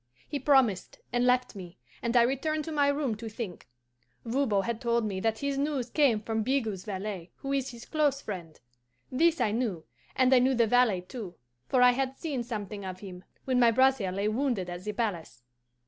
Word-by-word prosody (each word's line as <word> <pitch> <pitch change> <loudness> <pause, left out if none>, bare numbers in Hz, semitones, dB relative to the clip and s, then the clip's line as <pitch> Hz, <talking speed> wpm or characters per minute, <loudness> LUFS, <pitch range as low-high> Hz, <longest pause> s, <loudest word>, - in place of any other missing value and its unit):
He 290 - -3
promised, 260 -8 +2 0.2
and 245 0 +2
left 250 0 +2
me, 180 -3 -9 0.2
and 235 +1 +1
I 235 - +7
returned 300 +5 -1
to 320 - -5
my 290 -2 +2
room 285 -4 0
to 225 +1 -6
think. 215 - -7 0.6
Voban 230 -5 +1
had 235 +1 -3
told 235 -2 +1
me 195 -3 -2
that 220 +2 0
his 280 +2 -2
news 275 -4 -1
came 265 -8 +3
from 220 0 -2
Bigot's 225 -6 -1
valet, 195 -3 -5
who 275 0 -4
is 270 -1 0
his 235 -2 -10
close 295 -3 +1
friend. 175 - -7 0.5
This 330 +5 +3
I 210 - +2
knew, 215 -8 -2 0.3
and 255 0 +4
I 255 - +7
knew 260 +1 +3
the 235 -1 +4
valet 225 -5 +3
too, 180 -1 -8 0.3
for 255 -2 +3
I 250 - +8
had 265 +1 -2
seen 285 -6 -3
something 210 -4 -5
of 185 -1 -6
him 185 -3 -9 0.2
when 255 -2 +2
my 240 -1 +6
brother 260 -4 +3
lay 200 +3 -1
wounded 215 -6 -1
at 175 +2 -7
the 210 - -1
palace. 185 - -3
235 Hz, 200 wpm, -29 LUFS, 205-265 Hz, 0.6 s, I